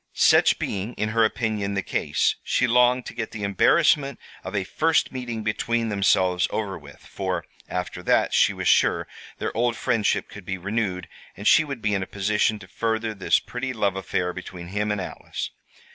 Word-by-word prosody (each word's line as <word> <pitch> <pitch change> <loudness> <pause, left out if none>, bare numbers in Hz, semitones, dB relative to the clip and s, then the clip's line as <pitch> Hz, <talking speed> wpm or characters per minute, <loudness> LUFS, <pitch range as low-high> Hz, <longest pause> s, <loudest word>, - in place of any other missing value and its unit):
Such - - +5
being, 100 +4 -3
in 110 - -1
her 115 +1 +3
opinion, 110 -3 -1
the 95 - -1
case, - - 0
she 125 - +1
longed 125 +1 +3
to - - -7
get 115 -2 -4
the 105 -2 -7
embarrassment 140 - +3 0.3
of 95 +2 -6
a 100 - +1
first 160 - +1
meeting 120 -4 -5
between 115 +2 0
themselves 95 -3 +2
over 100 -3 -3
with, 70 -1 -14
for, - - -3 0.2
after 90 0 -4
that, - - +2
she - - +5
was - - -4
sure, - - +3 0.3
their - - -4
old 120 +1 +1
friendship 115 -3 0
could 100 - -11
be 95 +1 -4
renewed, 95 -1 -2 0.3
and 105 - -3
she 160 - +7
would 140 -6 -6
be 105 -1 +1
in 100 - 0
a 95 - -4
position 105 +2 +1
to 95 - -13
further 110 +2 -2
this 95 -2 +2
pretty 130 +1 -5
love 100 -4 0
affair 90 -1 -2
between 90 -1 -8
him 105 +2 -1
and 105 - -1
Alice. 95 - -5
105 Hz, 190 wpm, -24 LUFS, 95-115 Hz, 0.3 s, she